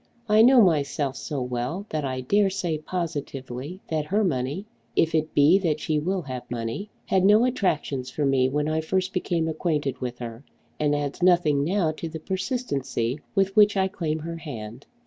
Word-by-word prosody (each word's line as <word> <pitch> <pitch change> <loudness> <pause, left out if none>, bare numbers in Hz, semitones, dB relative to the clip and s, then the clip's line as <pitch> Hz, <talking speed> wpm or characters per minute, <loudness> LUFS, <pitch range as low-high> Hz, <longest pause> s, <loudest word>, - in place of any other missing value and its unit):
I 215 0 +5
know 250 +1 +7
myself 145 -5 +1
so 140 -3 -4
well 125 +10 -3
that 155 -1 -2
I 130 -1 -2
dare 200 +9 +3
say 180 -5 -2
positively 150 -2 -5
that 155 -2 -1
her 205 +7 +1
money, 145 +2 -1 0.3
if 165 -1 +2
it 155 0 0
be 150 +7 +6
that 160 -5 0
she 155 0 0
will 185 +4 -1
have 130 -3 -7
money, 120 - -4 0.2
had 190 -1 +2
no 210 +4 +6
attractions 150 - -1
for 145 +3 -1
me 130 -1 +3
when 150 +2 0
I 155 0 0
first 185 +4 -1
became 170 -3 0
acquainted 155 -4 -1
with 125 -1 -4
her, 115 +1 -7 0.4
and 145 -1 +2
adds 145 +2 -3
nothing 175 -6 +4
now 175 0 +1
to 160 +1 -6
the 160 0 -6
persistency 150 - -2 0.2
with 195 0 +2
which 210 -1 +6
I 190 0 +3
claim 165 -5 -2
her 165 +1 -6
hand. 120 -6 -8
155 Hz, 185 wpm, -25 LUFS, 135-185 Hz, 0.4 s, know